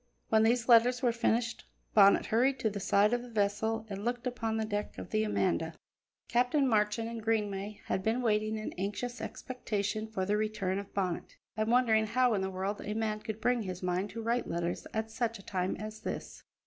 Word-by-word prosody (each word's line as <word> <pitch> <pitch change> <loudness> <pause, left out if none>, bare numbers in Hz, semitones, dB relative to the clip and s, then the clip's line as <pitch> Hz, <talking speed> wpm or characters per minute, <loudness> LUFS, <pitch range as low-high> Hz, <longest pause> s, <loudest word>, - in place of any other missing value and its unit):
When 220 0 +5
these 235 +2 +3
letters 245 +1 +5
were 245 - +4
finished 230 0 0 0.3
Bonnet 200 -2 +6
hurried 255 +4 +2
to 220 - +1
the 200 - -4
side 205 +3 +3
of 245 - +1
the 245 - -10
vessel 220 +1 0
and 200 -1 -6
looked 240 +1 -2
upon 230 -3 -1
the 220 - 0
deck 210 -1 -3
of - - -8
the 215 0 +2
Amanda. 175 -6 0 0.5
Captain 250 +4 +2
Marchand 215 -1 +1
and 230 -1 -5
Greenway 210 -2 -1
had - - -1
been 225 +5 0
waiting 215 -1 +1
in 215 - -5
anxious 240 +6 -3
expectation 215 -3 -3
for 195 -4 -2
the 205 +2 +1
return 210 -3 -1
of 200 0 -8
Bonnet, 185 -4 -2 0.2
and 215 +1 0
wondering 225 -3 +4
how 250 +1 +3
in 200 - +1
the 190 - -1
world 190 +2 -3
a 210 - -3
man 215 -1 -1
could 220 0 -6
bring 245 +1 +2
his 185 -3 -5
mind 180 +3 0
to 230 +2 -6
write 235 +2 0
letters 170 +1 -2
at 220 0 -3
such 230 0 -1
a 195 - -14
time 185 -4 -1
as 215 0 -7
this. - - -6
220 Hz, 205 wpm, -31 LUFS, 200-230 Hz, 0.5 s, Bonnet